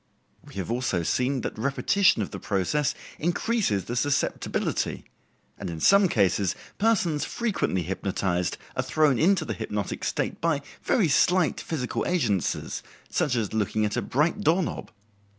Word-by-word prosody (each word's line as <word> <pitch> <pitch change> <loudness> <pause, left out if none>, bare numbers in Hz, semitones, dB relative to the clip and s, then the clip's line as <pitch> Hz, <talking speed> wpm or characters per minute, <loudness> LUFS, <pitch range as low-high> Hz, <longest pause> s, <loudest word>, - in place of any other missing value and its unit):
We - - -15
have 95 +3 -3
also 120 -8 0
seen 130 +8 0
that - - -4
repetition 140 - +3
of - - -7
the - - -6
process 140 +10 0 0.2
increases 175 - 0
the 120 - -4
susceptibility, 140 +3 -1 0.5
and 95 - -4
in 80 -1 -5
some 200 - +6
cases 95 - +2 0.2
persons 190 -9 +2
frequently 200 - -1
hypnotized 90 -1 -1 0.2
are - - +1
thrown 140 +1 +2
into 190 +5 +3
the 110 - -2
hypnotic 100 0 -4
state - - -2
by 160 -4 +1 0.2
very 210 -9 +2
slight 175 +3 +3
physical 135 -7 -2
agencies, 115 - 0 0.3
such 130 - +1
as 110 -4 -1
looking 110 0 +1
at 105 - -2
a - - 0
bright 160 - 0
doorknob. 170 +1 +1
130 Hz, 145 wpm, -26 LUFS, 100-170 Hz, 0.5 s, some